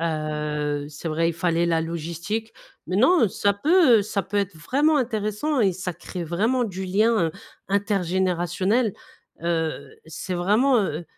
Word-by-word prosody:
Heu, 150 -2 -2
c'est 150 +3 -7
vrai, 165 +2 +1
il - - -1
fallait 170 0 0
la 165 -1 +2
logistique. 170 +7 -4 0.3
Mais 185 - -2
non, 260 - +5
ça 200 +2 +1
peut, 285 - +5
heu, - - +1
ça 200 -1 -2
peut 205 +3 -5
être 200 -3 0
vraiment 285 - +2
intéressant 230 +3 -1
et 195 -3 +3
ça 180 0 -4
crée 175 +2 -7
vraiment 220 +10 +1
du 190 -2 -5
lien, 205 +5 +2 0.2
heu, 160 - -4 0.4
intergénérationnel. 190 +2 0 0.5
Heu, 165 -2 -2
c'est 180 +3 -5
vraiment, 215 +9 +3
heu 175 -5 -2
185 Hz, 155 wpm, -24 LUFS, 165-215 Hz, 0.5 s, non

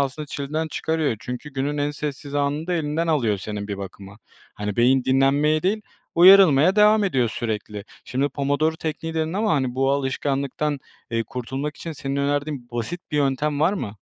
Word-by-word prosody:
aslında 140 +2 -2
çileden 150 +3 -3
çıkarıyor. 160 -5 -1
Çünkü 125 +6 -7
günün 145 +2 -2
en 145 +1 0
sessiz 145 -1 -6
anını 145 +2 0
da 180 - -1
elinden 160 +1 -1
alıyor 120 -11 +1
senin 105 +1 -5
bir 100 -1 -4
bakıma. 100 +2 -9 0.4
Hani, 105 -1 -4
beyin 125 +2 +4
dinlenmeye 140 +4 +3
değil, 205 +4 +1 0.3
uyarılmaya 180 -2 +7
devam 210 0 +5
ediyor 130 - +1
sürekli. 105 -3 -4 0.2
Şimdi 135 +3 0
Pomodoro 145 +3 0
Tekniği 160 +1 -4
dedin 160 0 -1
ama, 210 +2 +1
hani, 130 -4 0
bu 135 +1 +2
alışkanlıktan, 140 +1 -1 0.3
eee, 115 0 0
kurtulmak 135 +5 -4
için 165 - -6
senin 140 -1 -4
önerdiğin 140 -2 -1
basit 120 +9 -4
bir 150 - -1
yöntem 145 +1 0
var 165 +5 +4
mı? 105 - -5
140 Hz, 170 wpm, -23 LUFS, 130-155 Hz, 0.4 s, uyarılmaya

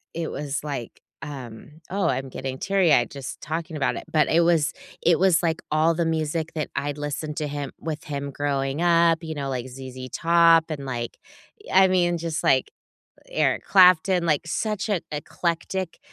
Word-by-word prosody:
it 165 -1 -3
was 145 0 -4
like, 135 -6 -6 0.2
um 140 +2 -9
oh, 195 0 +1
I'm 135 0 -1
getting 130 0 -5
teary-eyed 170 - +3
just 135 -2 -7
talking 160 0 -4
about 135 - 0
it, - - -6
but 155 -1 +3
it 165 - +4
was 165 -2 +2 0.3
it 170 -2 +4
was 180 -3 +4
like 165 -1 0
all 160 +2 +3
the 170 +1 0
music 160 0 -1
that 155 - -2
I'd 145 +1 -2
listened 150 +1 -4
to 150 - -1
him 145 -1 -4
with 155 -2 -5
him 140 -1 -4
growing 140 +1 -1
up, 170 -1 +4
you 160 - -4
know, 140 -1 -3
like 130 -1 -3
ZZ 130 0 -8
Top 165 -1 +5
and, 140 -3 -5
like, 120 -3 -4 0.6
I 190 0 +7
mean, 175 -2 +2
just 165 -1 -3
like, 430 - +3 0.6
Eric - - +1
Clapton, 180 -1 +5
like 155 -3 +2
such 215 +5 -2
an 195 -4 +1
eclectic, 170 +4 -3
155 Hz, 175 wpm, -24 LUFS, 140-170 Hz, 0.6 s, I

